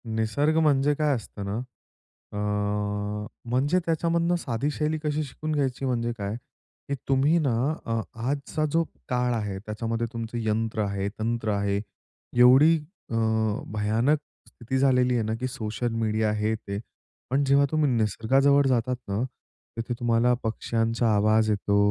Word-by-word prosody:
निसर्ग 140 +9 +1
म्हणजे 145 -2 +3
काय 150 -1 +2
असतं 100 -1 -7
ना, 100 +3 -2 0.8
अ, - - -4 1.1
म्हणजे 140 +9 +2
त्याच्यामधनं 170 +1 +1
साधी 135 -4 -2
शैली 155 +1 -1
कशी 150 0 0
शिकून 155 +2 -5
घ्यायची 135 -2 -1
म्हणजे 120 -2 0
काय, 100 0 -3 0.5
की 140 - 0
तुम्ही 140 +5 +4
ना 140 -6 +1 0.3
अ, 115 0 0 0.3
आजचा 145 +2 -1
जो 165 +2 +3 0.3
काळ 125 -1 +1
आहे, 105 -4 -2
त्याच्यामध्ये 115 +2 -3
तुमचं 115 0 -4
यंत्र 110 0 0
आहे, 100 0 -2
तंत्र 115 -1 -1
आहे. 100 0 0 0.6
एवढी 135 +7 +7 0.3
अ, 115 - -3 0.6
भयानक 110 +8 +2 0.3
स्थिती 125 +3 -4
झालेली 125 -2 +3
आहे 115 - +1
ना, 110 +1 -1
की 130 - -1
सोशल 115 0 -3
मीडिया, 110 -1 +1
हे, 105 +1 0
ते. 100 -2 -5 0.5
पण 135 +3 +2
जेव्हा 140 +1 +5
तुम्ही 155 -2 +2
निसर्गाजवळ 135 +6 +3
जातात 125 0 +1
ना, 100 +2 -1 0.6
तिथे 115 +2 -2
तुम्हाला 120 +1 +3
पक्ष्यांचा 115 +1 0
आवाज 110 +1 +3
येतो, 100 -1 +1
120 Hz, 140 wpm, -26 LUFS, 110-140 Hz, 1.1 s, एवढी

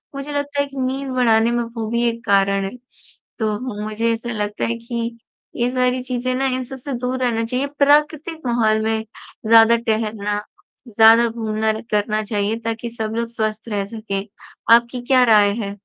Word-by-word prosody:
मुझे 275 +1 -5
लगता 285 0 -2
है - - 0
कि 275 0 -12
नींद 265 +1 -2
बढ़ाने 230 -2 +3
में 240 0 0
वो 230 -1 -5
भी 235 0 +1
एक 230 +1 -7
कारण 195 -1 +2
है। 195 - -4 0.7
तो 215 -1 -1 0.2
मुझे 220 +2 -1
ऐसा 230 +1 -3
लगता 210 -1 -2
है 235 0 -2
कि 235 0 -4 0.4
ये 240 0 0
सारी 250 0 +1
चीज़ें 255 0 -2
ना 270 +1 0
इन 255 - -3
सब 265 +1 -8
से 275 +2 -6
दूर 250 +1 -2
रहना 230 -2 0
चाहिए 255 +4 -1
प्राकृतिक 300 +3 +2
माहौल 220 -3 +2
में 220 0 -1 0.4
ज़्यादा 225 +1 +7
टहलना, 215 -3 -1 0.5
ज़्यादा 225 +1 +6
घूमना 220 -1 -1
र 220 - -5
करना 210 +1 +1
चाहिए 210 +1 -1
ताकि 230 +1 -3
सब 220 -1 -4
लोग 235 0 -1
स्वस्थ 220 0 -3
रह 200 -2 -1
सकें। 200 -2 -4 0.5
आपकी 235 +1 +3
क्या 255 -2 +5
राय 205 -1 +5
है? 200 +1 -6
230 Hz, 180 wpm, -20 LUFS, 215-250 Hz, 0.7 s, ज़्यादा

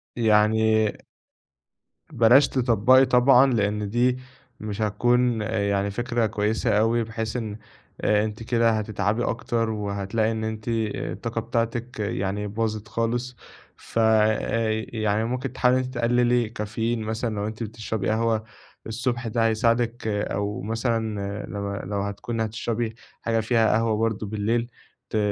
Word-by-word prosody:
يعني 110 -1 +3 1.2
بلاش 120 +5 +6
تطبَّقي 130 +1 +4
طبعًا؛ 125 +1 +5
لأن 105 -1 0
دي 125 +3 +2 0.4
مش 105 0 -5
هتكون 120 +2 +2
يعني 100 -2 0
فكرة 120 +1 0
كويسة 105 0 0
أوي، 115 +1 +2
بحيث 115 0 -4
إن 110 -3 -4 0.4
آآ، 105 0 +3
أنتِ 110 +1 -6
كده 115 -1 +2
هتتعبي 110 +1 -1
أكتر 115 -1 -1
وهتلاقي 105 +1 -1
إن 110 0 -3
أنتِ 110 0 -5
آآ، 110 -2 -2
الطاقة - - -3
بتاعتِك 115 0 -2
يعني 100 0 -2
باظِت 110 0 -3
خالص. 120 +2 -2 0.4
ف 115 - -4
آآ، 110 0 +2
يعني 110 0 0
ممكن 125 +2 -3
تحاولي 125 0 +3
إن - - -1
أنتِ 130 +1 -7
تقلّلي 120 -1 +2
كافيين 115 +1 -2
مثلًا 110 0 -2
لو 100 +1 -2
أنتِ 110 +1 -5
بتشربي 110 -2 -3
قهوة 110 0 +1 0.4
الصبح 120 +1 -2
ده 115 +1 +1
هيساعدِك، 115 +1 +1
أو 105 -1 -2
مثلًا 110 -2 -2
لو 100 -1 -4
لو 100 0 -3
هتكوني 110 +3 -3
هتشربي 110 +1 -3 0.3
حاجة 115 -1 0
فيها 110 0 +2
قهوة 115 -1 +1
برضو 110 -1 -1
بالليل، 110 +3 -1 0.4
ت 110 - -1
110 Hz, 135 wpm, -24 LUFS, 105-120 Hz, 1.2 s, بلاش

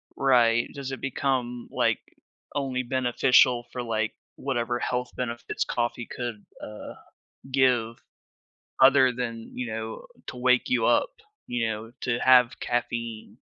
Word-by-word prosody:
Right, 120 -3 +3
does 140 -2 -6
it 130 - -6
become, 125 -3 -2
like, - - +1 0.6
only 130 -2 -1
beneficial 125 -1 +3
for, 125 -1 -4
like, 110 -2 -1 0.2
whatever 120 -3 -2
health 125 0 -2
benefits 120 -2 -3
coffee 120 0 -2
could, 120 -4 -6 0.2
uh, 105 0 -8 0.5
give, 125 -4 +2 0.8
other 130 -1 +7
than, 115 -2 -6
you 125 -1 -3
know, 110 0 -6 0.2
to 125 - -7
wake 125 - +2
you 255 - +2
up, - - +3 0.3
you 120 -2 -1
know, 110 +1 -5
to 120 -2 -1
have 125 -1 +5
caffeine. 120 -2 -3
120 Hz, 130 wpm, -26 LUFS, 115-130 Hz, 0.8 s, other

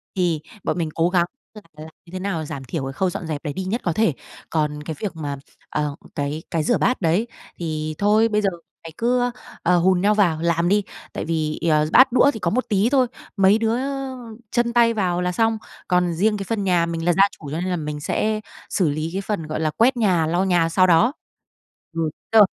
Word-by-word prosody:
Thì 175 -4 +1 0.2
bọn - - -1
mình 165 -3 -1
cố 165 +1 +2
gắng 175 -2 +3 0.3
là 215 - -11 0.2
làm 155 +1 -9 0.2
như 170 - -16
thế 185 - -5
nào 185 -5 -2
giảm 140 -2 -6
thiểu 135 +3 -4
cái 135 0 -4
khâu 185 +6 0
dọn 175 -1 -5
dẹp 150 -3 -4
đấy 150 -3 -3
đi 190 - -4
nhất 205 +6 -2
có 175 - 0
thể. 215 -4 +2 0.4
Còn 150 -2 -1
cái 160 +1 -5
việc 205 -5 -4
mà, 145 -3 -4 0.3
ờ, 150 -1 -2 0.2
cái 145 +3 -3
cái 160 -2 0
rửa 240 - +2
bát 250 - +1
đấy, 180 +7 +2 0.3
thì 155 -2 -3
thôi 210 +2 +4
bây 210 -1 +1
giờ 195 - +2 0.4
mày 165 - -7
cứ, 245 +1 +1 0.3
ờ, 180 +1 +4
hùn 180 +1 +3
nhau 205 +2 +4
vào 175 -7 +2
làm 170 0 +1
đi, 205 +1 +3 0.3
tại - - -4
vì, 155 -1 -1
ờ, 155 -1 +3
bát 260 +1 +7
đũa 275 +3 +5
thì - - -6
có 170 - 0
một 255 +3 0
tí 205 +2 +2
thôi, 260 -2 +3 0.3
mấy 195 +2 +5
đứa 225 0 +1 0.8
chân 235 -1 +1
tay 235 -1 +4
vào 180 -5 0
là 180 0 0
xong. 225 +4 +1 0.3
Còn 180 -1 +2
riêng 210 +5 +1
cái 195 - -4
phần 220 -3 -1
nhà, 180 -3 +3
mình 165 -1 -3
là 175 - +4
gia 195 +4 +5 0.2
chủ 145 -3 -8
cho 155 - -2
nên 185 - -2
là 180 - 0
mình 150 -3 -4
sẽ 215 +8 0 0.3
xử 180 -6 +1
lý 155 +2 -2
cái 195 - -1
phần, 195 -6 -3
gọi 155 - -3
là, 155 -1 +1
quét 245 - +3
nhà, 180 -8 +2
lau 175 +4 +1
nhà 175 -3 +2
sau 185 +2 +4
đó. 180 +10 +4 0.8
Ừ, 165 -1 0 0.2
rồi. 220 -2 +8
180 Hz, 235 wpm, -22 LUFS, 160-210 Hz, 0.8 s, rồi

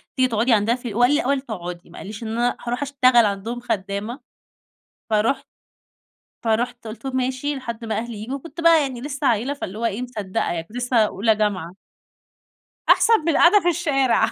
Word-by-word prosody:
تيجي 260 -1 +3
تقعدي 230 +1 +2
عندنا 220 +2 +3
ف 250 -1 -8
هو 225 +1 -2
قال 245 +2 +5
لي 295 - +3
الأول 275 +1 0
تقعدي 180 -8 -7
ما - - -13
قاليش 205 +3 -8
إن - - -5
أنا 240 +2 0
هارُوح 245 +3 -2
أشتغل 255 -4 +4
عندهم 210 +4 -3
خدامة، 205 +2 -3 0.9
فرُحت 215 +5 +1 1.0
فرُحت 235 +1 -1
قلت 220 +5 -9
له 270 - -2
ماشي 260 +3 -1
لحد 235 -3 -6
ما 220 -2 -2
أهلي 230 -1 -5
ييجوا، 225 +6 -5
وكنت 330 +4 -9
بقى 330 -2 +6
يعني 260 -4 -4
لسه 280 +1 -3
عيّلة 240 +5 +1
فاللي 215 -7 -6
هو 235 - -3
إيه 230 +1 -1
مصدقة 215 -7 -3
يعني، 170 -1 -3
كنت 215 +8 -13
لسه 245 0 -1
أولى 215 0 +3
جامعة. 190 -5 -1 1.1
أحسن 455 -1 +6
من 320 - -1
القاعدة 345 +6 +6
في 350 - -2
الشارع. 290 -7 +2
240 Hz, 190 wpm, -22 LUFS, 215-270 Hz, 1.1 s, بقى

